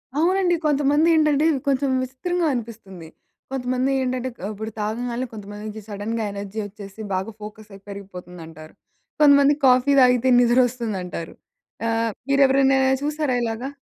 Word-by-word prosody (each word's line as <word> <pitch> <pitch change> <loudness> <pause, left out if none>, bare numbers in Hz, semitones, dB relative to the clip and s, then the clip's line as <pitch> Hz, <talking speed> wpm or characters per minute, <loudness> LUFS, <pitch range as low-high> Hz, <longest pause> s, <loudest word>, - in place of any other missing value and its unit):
అవునండి. 350 +3 +2
కొంతమంది 295 +1 +2
ఏండంటే, 305 -1 +3 0.2
కొంచెం 275 0 +1
విసిత్రంగా 340 +7 -2
అనిపిస్తుంది. 215 -8 -7 0.4
కొంతమంది 255 0 -1
ఏంటంటే 255 0 -2 0.2
ఆహ్, 205 - -3
ఇప్పుడు 220 +2 -6
తాగంగాల్నే 235 +4 -3
కొంతమందికి 210 +1 -8
సడెన్‌గ 210 +3 -4
ఎనర్జీ 200 +1 -6
వచ్చేసి 205 0 -10
బాగా 190 +4 -2
ఫోకస్ 215 0 -10
అయి 195 - -13
పెరిగిపోతుందంటారు. 180 -5 -10 0.5
కొంతమంది 285 -1 +6
కాఫీ 255 +2 +4
తాగితే 250 0 +4
నిద్రొస్తుందంటారు. 235 -8 0 0.5
ఆహ్, 225 0 0 0.2
మీరు 275 0 +3
ఎవరినయినా 270 0 +3 0.2
చూసారా 295 -3 -1
ఇలాగా? 230 +3 -3
240 Hz, 120 wpm, -22 LUFS, 205-270 Hz, 0.5 s, కొంతమంది